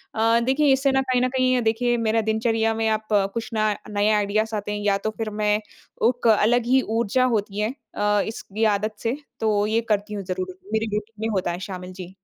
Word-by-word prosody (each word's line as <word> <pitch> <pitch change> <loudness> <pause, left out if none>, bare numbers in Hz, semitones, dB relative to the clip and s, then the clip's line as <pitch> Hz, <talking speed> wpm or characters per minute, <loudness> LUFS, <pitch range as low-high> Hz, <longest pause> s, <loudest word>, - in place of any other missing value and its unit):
अ, 225 +1 +3
देखिए 275 +2 +3
इससे 270 +1 +2
ना 265 0 +2
कहीं 255 -1 +1
न 255 - +2
कहीं 255 -1 +2
देखिए 235 +2 +1
मेरा 225 0 +1
दिनचर्या 225 0 +1
में 225 0 -1
आप 215 0 -1 0.3
कुछ 230 -1 -4
ना 215 -1 +2 0.2
नए 205 0 +1
आइडियाज़ 215 +2 0
आते 210 0 -3
हैं 210 - -2
या 200 -1 +3
तो - - 0
फिर 225 -1 -2
मैं 210 0 +3 0.5
उक 245 -1 -1
अलग 225 +2 +4
ही 260 +2 +4 0.2
ऊर्जा 235 +3 +2
होती 205 0 -2
है 215 +4 0 0.2
अ, 205 0 +2
इसकी 220 -1 -4
आदत 215 +1 -3
से, 235 +4 -1 0.2
तो 210 -2 +2
ये 225 +2 +1
करती 210 0 0
हूँ 200 -1 -4
ज़रूर। 185 0 -4 0.2
मेरे 220 +1 +1
रूटीन 210 0 -6
में - - -2
होता 180 -2 0
है 175 - -5
शामिल। 180 -1 -6
जी। 180 +1 -9
220 Hz, 215 wpm, -23 LUFS, 210-235 Hz, 0.5 s, अलग